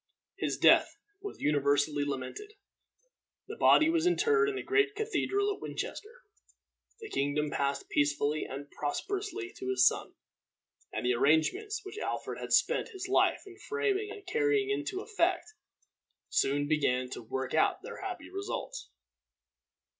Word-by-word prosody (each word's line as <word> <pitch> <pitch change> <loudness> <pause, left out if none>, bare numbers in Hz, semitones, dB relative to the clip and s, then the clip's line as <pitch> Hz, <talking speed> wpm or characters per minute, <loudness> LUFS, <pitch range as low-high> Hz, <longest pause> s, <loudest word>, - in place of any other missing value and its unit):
His - - -2
death - - +5 0.2
was 405 0 -8
universally 145 0 +2
lamented. 145 - -5 0.9
The - - -6
body 310 - +5
was 330 +1 +2
interred 435 +4 +3
in 410 - -3
the 395 - -4
great 410 0 +2
cathedral 410 -1 0
at - - -12
Winchester. 475 +4 -6 0.8
The 435 - -7
kingdom 145 +2 0
passed 140 0 -1
peacefully 145 +1 +1
and 140 +2 -6
prosperously 385 - -3
to 130 - -4
his 125 -1 +5
son, - - -1 0.8
and - - -4
the 125 - +3
arrangements 265 - +2
which 390 +2 -7
Alfred - - -4
had - - -6
spent 485 - +3
his 375 -1 -6
life 385 - +2
in 385 0 -13
framing 420 -2 -1
and 410 -1 -9
carrying 425 0 +1
into 390 -1 -2
effect, 380 -1 0 0.8
soon 145 +1 +1
began 130 -5 +1
to - - -6
work 130 +3 -4
out - - +2
their - - -8
happy 385 -2 -6
results. 405 +5 -5
370 Hz, 140 wpm, -30 LUFS, -, 0.9 s, death